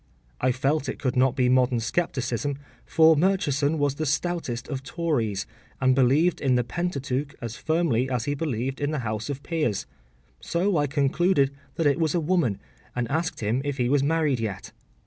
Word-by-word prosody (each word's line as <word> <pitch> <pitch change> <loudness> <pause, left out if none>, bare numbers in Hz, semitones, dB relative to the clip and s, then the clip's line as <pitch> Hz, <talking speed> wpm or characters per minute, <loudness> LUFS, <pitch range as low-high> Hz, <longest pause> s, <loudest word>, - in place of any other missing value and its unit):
I 130 - +2
felt 135 +2 0
it - - -4
could 130 -3 -1
not 130 0 +3
be 125 -1 +2
modern 125 -1 +3
scepticism, 135 0 -1 0.3
for 160 0 +6
Murchison 155 -4 +1
was 145 -2 +1
the 155 +2 -3
stoutest 145 -5 -2
of 135 -3 -4
Tories, 135 - -1 0.3
and 130 -1 +4
believed 135 +7 +3
in 130 -3 +2
the 125 - +2
Pentateuch 145 -3 -3
as 115 -1 -5
firmly 155 -6 +1
as 125 -3 -1
he 145 - 0
believed 135 -3 -3
in 145 - +1
the 150 -6 -3
House 110 +4 -3
of 140 0 -4
Peers; 150 - -1 0.5
so 185 +3 0
I 145 -1 +2
concluded 140 +1 +2 0.2
that 165 - -1
it 145 +2 +3
was 160 0 +1
a - - +3
woman, 160 - +1 0.4
and 125 -1 -1
asked 160 -2 -1
him 110 +5 0
if 145 -1 -3
he 125 -2 +1
was 140 0 +3
married 150 -3 +1
yet. 100 -4 -4
140 Hz, 185 wpm, -25 LUFS, 125-160 Hz, 0.5 s, for